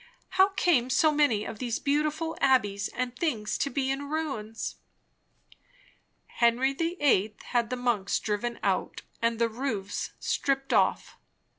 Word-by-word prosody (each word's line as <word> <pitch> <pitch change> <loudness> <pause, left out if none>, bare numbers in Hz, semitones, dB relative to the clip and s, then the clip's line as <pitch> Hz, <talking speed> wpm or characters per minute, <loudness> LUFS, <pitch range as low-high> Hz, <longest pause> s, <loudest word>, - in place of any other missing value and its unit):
How 380 +1 +5
came 260 -9 +3
so 305 +4 +4
many 290 -9 +2
of 215 - -7
these 240 -3 -1
beautiful 305 +3 0
abbeys 205 -7 +2
and 250 0 -4
things 240 -8 -1
to 280 - 0
be 270 -1 -1
in 280 +1 -4
ruins?" 275 -9 -4 1.5
"Henry 245 +3 +2
the 335 +5 -2
Eighth 215 -7 +2
had 235 -3 0
the 255 - -1
monks 240 -6 0
driven 225 +3 -2
out - - -1 0.2
and 230 0 +1
the 230 0 +2
roofs 220 -4 -3
stripped 270 -1 -1
off. - - +1
255 Hz, 140 wpm, -28 LUFS, 225-290 Hz, 1.5 s, How